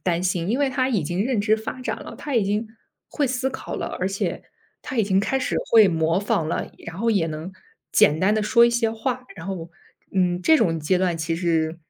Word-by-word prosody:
担 175 Hz, -1 st, +1 dB
心。 180 Hz, -1 st, -1 dB
因 245 Hz, +6 st, 0 dB
为 280 Hz, -2 st, +2 dB
他 260 Hz, -1 st, 0 dB
已 220 Hz, -9 st, +1 dB
经 175 Hz, +7 st, -1 dB
认 255 Hz, -5 st, 0 dB
知 215 Hz, +1 st, +3 dB
发 220 Hz, +4 st, -6 dB
展 -, -, -2 dB
了， -, -, -9 dB
他 285 Hz, -4 st, -3 dB
已 215 Hz, -, +3 dB
经 210 Hz, +3 st, -1 dB, 0.4 s
会 290 Hz, -, 0 dB
思 260 Hz, +1 st, -1 dB
考 -, -, -6 dB
了， -, -, -3 dB
而 185 Hz, -, 0 dB
且， 195 Hz, 0 st, -3 dB, 0.4 s
他 280 Hz, -, -6 dB
已 225 Hz, -, +3 dB
经 195 Hz, -1 st, +2 dB
开 240 Hz, +6 st, 0 dB
始 255 Hz, -, -2 dB, 0.2 s
会 220 Hz, -3 st, +8 dB
模 165 Hz, +1 st, +1 dB
仿 185 Hz, -5 st, 0 dB
了， -, -, -3 dB, 0.2 s
然 165 Hz, -, -7 dB
后 230 Hz, +4 st, +1 dB
也 195 Hz, -7 st, +2 dB
能 160 Hz, +3 st, -6 dB, 0.4 s
简 150 Hz, +2 st, +4 dB
单 190 Hz, +3 st, +3 dB
地 215 Hz, -, +1 dB
说 235 Hz, +2 st, +5 dB
一 235 Hz, -, +4 dB
些 235 Hz, -1 st, +1 dB
话， 250 Hz, +3 st, -3 dB
然 165 Hz, -, -9 dB
后， 175 Hz, -4 st, -5 dB, 0.5 s
嗯， 180 Hz, -2 st, +1 dB
这 315 Hz, -, +5 dB
种 165 Hz, -, +1 dB
阶 155 Hz, +4 st, +1 dB
段 180 Hz, -2 st, 0 dB
其 160 Hz, +1 st, -1 dB
实 165 Hz, -1 st, 0 dB
195 Hz, 250 characters per minute, -23 LUFS, 170-235 Hz, 0.5 s, 会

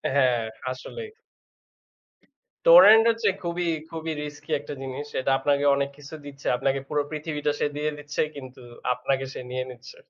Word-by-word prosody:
হ্যাঁ, 125 Hz, -4 st, +3 dB, 0.3 s
আসলেই। 445 Hz, -, -7 dB, 1.6 s
Torrent 230 Hz, -, +9 dB
হচ্ছে 230 Hz, -2 st, +1 dB
খুবই, 175 Hz, 0 st, -2 dB, 0.2 s
খুবই 160 Hz, -1 st, -4 dB
risky 150 Hz, +1 st, -10 dB
একটা 145 Hz, -, -7 dB
জিনিস। 135 Hz, +2 st, -5 dB
এটা 130 Hz, -, 0 dB
আপনাকে 140 Hz, +1 st, +1 dB
অনেক 140 Hz, 0 st, -1 dB
কিছু 145 Hz, +2 st, -10 dB
দিচ্ছে, 140 Hz, -1 st, -10 dB
আপনাকে 135 Hz, +1 st, 0 dB
পুরো 150 Hz, -1 st, +1 dB
পৃথিবীটা 150 Hz, -1 st, -2 dB
সে -, -, +2 dB
দিয়ে 150 Hz, +1 st, 0 dB
দিচ্ছে 145 Hz, 0 st, -2 dB
কিন্তু 130 Hz, -2 st, -10 dB, 0.3 s
আপনাকে 135 Hz, +1 st, -1 dB
সে -, -, -5 dB
নিয়ে 130 Hz, 0 st, -2 dB
নিচ্ছে। 125 Hz, -, -12 dB
145 Hz, 150 wpm, -25 LUFS, 135-160 Hz, 1.6 s, Torrent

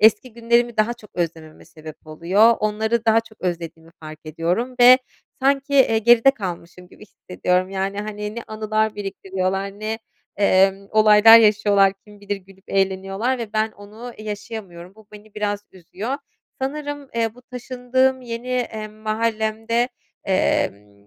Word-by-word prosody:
eski 220 Hz, +3 st, +4 dB
günlerimi 235 Hz, +1 st, +1 dB
daha 215 Hz, +3 st, +1 dB
çok 215 Hz, -4 st, -17 dB
özlememe 160 Hz, -2 st, -5 dB
sebep 155 Hz, -1 st, -13 dB
oluyor, 190 Hz, +9 st, +3 dB
onları 220 Hz, +2 st, 0 dB
daha 225 Hz, 0 st, +4 dB
çok 225 Hz, -1 st, -20 dB
özlediğimi 165 Hz, -2 st, -5 dB
fark 155 Hz, -1 st, -10 dB
ediyorum 175 Hz, -, -2 dB
ve 250 Hz, +1 st, +9 dB, 0.4 s
sanki, 275 Hz, +1 st, +1 dB
eee, 255 Hz, -5 st, +4 dB
geride 235 Hz, +3 st, +6 dB
kalmışım 180 Hz, -6 st, -8 dB
gibi 210 Hz, -, -15 dB
hissediyorum. 180 Hz, 0 st, -2 dB
Yani, 195 Hz, +1 st, -3 dB
hani, 210 Hz, 0 st, -6 dB
ne 235 Hz, -, -5 dB
anılar 215 Hz, 0 st, -1 dB
biriktiriyorlar, 195 Hz, 0 st, -4 dB
ne, 220 Hz, +1 st, -3 dB, 0.4 s
emm, 195 Hz, 0 st, +3 dB
olaylar 215 Hz, +1 st, +8 dB
yaşıyorlar, 205 Hz, -3 st, +4 dB
kim 205 Hz, -1 st, -16 dB
bilir 205 Hz, 0 st, -3 dB
gülüp 195 Hz, 0 st, -19 dB
eğleniyorlar 195 Hz, +6 st, -1 dB
ve 225 Hz, -3 st, -6 dB
ben 215 Hz, 0 st, 0 dB
onu 215 Hz, +4 st, -11 dB
yaşayamıyorum. 205 Hz, -4 st, -8 dB
Bu 220 Hz, -1 st, -19 dB
beni 210 Hz, 0 st, -15 dB
biraz 205 Hz, -1 st, -3 dB
üzüyor. 190 Hz, +8 st, -5 dB, 0.5 s
Sanırım, 290 Hz, 0 st, -4 dB
eee, 225 Hz, -1 st, -1 dB
bu 250 Hz, -, -17 dB
taşındığım 255 Hz, +1 st, -1 dB
yeni, 235 Hz, +1 st, -6 dB
eee, 230 Hz, -4 st, -3 dB
mahallemde, 220 Hz, +2 st, -1 dB, 0.4 s
emm, 100 Hz, -, -1 dB
215 Hz, 140 wpm, -21 LUFS, 190-230 Hz, 0.5 s, ve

